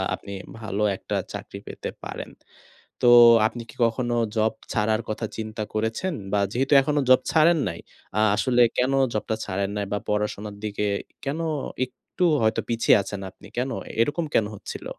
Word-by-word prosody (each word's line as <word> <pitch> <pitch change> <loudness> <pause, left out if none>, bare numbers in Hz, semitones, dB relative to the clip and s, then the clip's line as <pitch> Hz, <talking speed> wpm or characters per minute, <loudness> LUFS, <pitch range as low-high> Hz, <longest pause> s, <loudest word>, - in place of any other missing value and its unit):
আপনি 100 - -10 0.3
ভালো 105 -1 -2
একটা - - -4 0.2
চাকরি - - -7
পেতে - - -6 0.2
পারেন। - - -6 0.7
তো - - +4 0.4
আপনি 120 +1 -4
কি - - -16
কখনো 120 +1 -1 0.2
জব 110 0 +2 0.2
ছাড়ার 110 0 +1
কথা 110 +1 -2
চিন্তা 110 0 -4
করেছেন? 110 +12 -1 0.2
বা 105 - +3
যেহেতু 135 +4 -1
এখনো 150 +1 +1
জব 130 - +7
ছাড়েন 165 +1 +5
নাই। 85 -1 -5 0.4
আ - - +4 0.2
আসলে 125 +3 +3
কেনো 135 +2 +2 0.2
জবটা 110 +1 -1
ছাড়েন 100 +1 -2
নাই? 105 - -1
বা 105 - +1
পড়াশোনার 105 0 -2
দিকে 105 0 -2 0.4
কেনো 155 +4 -2 0.4
একটু 130 +7 -5 0.2
হয়তো 110 0 +2
পিছিয়ে 115 +1 +4
আছেন 100 +1 -6
আপনি 95 - -17
কেনো? 130 +2 -1 0.2
এরকম 145 +8 +1
কেনো 105 - +3
হচ্ছিল? - - -8
110 Hz, 160 wpm, -25 LUFS, 105-130 Hz, 0.7 s, জব